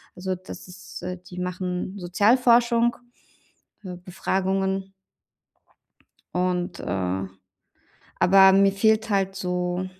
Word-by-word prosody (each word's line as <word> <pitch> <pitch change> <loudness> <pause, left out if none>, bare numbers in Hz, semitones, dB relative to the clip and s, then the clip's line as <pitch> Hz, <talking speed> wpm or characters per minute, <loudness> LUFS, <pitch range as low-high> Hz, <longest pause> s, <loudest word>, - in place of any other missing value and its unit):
Also, 185 +1 -3
das 185 +1 -11
ist 180 - -11
äh, 180 0 -4
die 180 0 -11
machen 180 +1 -4
Sozialforschung, 235 +5 +3 0.9
äh, 180 -1 -6
Befragungen. 190 +1 -2 1.4
Und, 180 0 -1
äh 95 0 -2 0.9
aber 190 +1 +7
mir 195 0 +4
fehlt 220 +2 +2
halt 195 -1 0
so 180 -1 -2
185 Hz, 95 wpm, -24 LUFS, 180-195 Hz, 1.4 s, aber